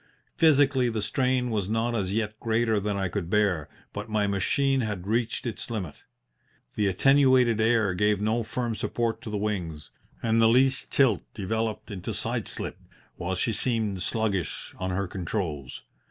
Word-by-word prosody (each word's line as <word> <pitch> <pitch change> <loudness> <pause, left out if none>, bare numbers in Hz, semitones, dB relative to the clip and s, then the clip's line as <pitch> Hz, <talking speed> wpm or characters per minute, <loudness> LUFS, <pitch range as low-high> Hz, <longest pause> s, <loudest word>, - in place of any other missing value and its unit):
Physically, 140 -5 +4
the 110 -1 -2
strain 125 +2 +1
was 105 -3 -1
not 115 +2 0
as 95 -5 -1
yet 110 0 -2
greater 110 -1 +1
than 100 0 -2
I 95 -1 0
could 90 -2 -4
bear, 95 -7 +1 0.2
but 105 +2 -6
my 105 -1 +1
machine 130 +7 +1
had 105 -5 -3
reached 115 +4 -1
its 120 0 -3
limit. 95 -10 -4 0.8
The 105 - +1
attenuated 130 +1 +4
air 110 -4 +3
gave 105 +2 +2
no 110 +3 +1
firm 115 +1 -2
support 115 +1 -2
to - - -7
the 105 - -2
wings, 90 -8 -3 0.3
and 115 0 +3
the 110 - +6
least 130 +3 +3
tilt 135 -4 +3
developed 110 +2 -2
into 95 -3 -5
side - - -2
slip, - - -5 0.4
while 90 +1 -2
she 110 +5 0
seemed 110 -5 0
sluggish 100 -4 -2
on 95 0 -2
her 95 +1 -1
controls. 85 - -4
110 Hz, 165 wpm, -27 LUFS, 100-120 Hz, 0.8 s, the